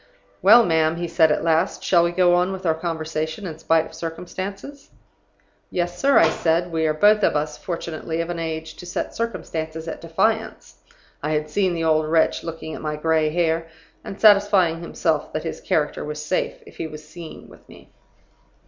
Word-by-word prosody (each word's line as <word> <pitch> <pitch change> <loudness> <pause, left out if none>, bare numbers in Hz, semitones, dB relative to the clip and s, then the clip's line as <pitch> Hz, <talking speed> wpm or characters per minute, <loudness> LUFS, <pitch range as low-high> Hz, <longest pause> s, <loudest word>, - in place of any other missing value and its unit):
"'Well, 225 +5 +7
ma'am,' 160 -1 +2
he 170 0 -3
said, 160 -2 +3
at - - 0
last, 165 +2 +1
'shall 170 -2 +4
we 170 - +1
go 175 0 +3
on 180 +2 +2
with 190 -1 -6
our 160 - +3
conversation 160 +2 -4
in 160 -4 -7
spite 165 0 +2
of - - -13
circumstances?' 190 - -7 0.8
"'Yes, 175 0 -2
sir,' 275 0 +4
I 165 - +6
said; 170 +2 0
'we 160 -1 0
are 155 - +1
both 210 +6 +5
of 190 - +2
us, 150 0 -1
fortunately, 165 -2 -5
of 165 +1 -2
an 170 - -4
age 160 -1 -4
to 180 - -10
set 175 - -4
circumstances 165 -8 -4
at - - -6
defiance' 220 +7 -1 0.4
(I 150 +2 -1
had 150 0 -2
seen 185 0 +1
the 165 - -2
old 155 -1 +2
wretch 160 0 +2
looking 160 -1 -6
at - - -7
my 150 -1 -3
gray 155 0 +1
hair, 165 0 0 0.4
and 195 - -8
satisfying 200 -5 +5
himself 165 -2 -1
that 155 - -3
his 165 - -5
character 150 -2 -1
was 150 0 -5
safe 185 - -2
if - - -15
he 165 - -3
was 155 -1 -11
seen 165 0 -10
with - - -18
me). - - -16
165 Hz, 195 wpm, -22 LUFS, 160-180 Hz, 0.8 s, Well